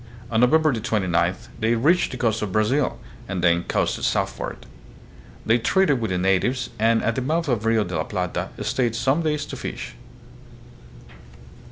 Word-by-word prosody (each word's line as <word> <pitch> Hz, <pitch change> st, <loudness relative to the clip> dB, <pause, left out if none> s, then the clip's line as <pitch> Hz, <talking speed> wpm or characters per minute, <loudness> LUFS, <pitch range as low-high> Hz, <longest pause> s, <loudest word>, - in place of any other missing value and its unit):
On 110 Hz, -, +2 dB
November 155 Hz, +4 st, +4 dB
29th 95 Hz, -6 st, -1 dB
they 115 Hz, +1 st, +2 dB
reached 155 Hz, +10 st, +3 dB
the 130 Hz, -, -6 dB
coast 115 Hz, -3 st, 0 dB
of 105 Hz, -3 st, -3 dB
Brazil 115 Hz, +4 st, +1 dB, 0.3 s
and 90 Hz, -2 st, -3 dB
then 85 Hz, 0 st, +4 dB
coasted -, -, -1 dB
southward. -, -, -2 dB, 0.8 s
They 115 Hz, +2 st, +3 dB
traded 145 Hz, +1 st, +2 dB
with 110 Hz, -, -1 dB
the 95 Hz, -, -1 dB
natives, 95 Hz, +8 st, +1 dB
and 115 Hz, +1 st, +3 dB
at 115 Hz, -, +1 dB
the 130 Hz, -, -2 dB
mouth 160 Hz, +5 st, -1 dB
of 120 Hz, -6 st, 0 dB
the 115 Hz, -, 0 dB
Rio 115 Hz, -1 st, +3 dB
de 90 Hz, -3 st, -5 dB
la 80 Hz, 0 st, -1 dB
Plata 90 Hz, -3 st, -3 dB
stayed 120 Hz, -3 st, 0 dB
some 135 Hz, +6 st, +1 dB
days 150 Hz, -2 st, -1 dB
to -, -, -7 dB
fish. -, -, -6 dB
115 Hz, 170 wpm, -23 LUFS, 100-130 Hz, 0.8 s, November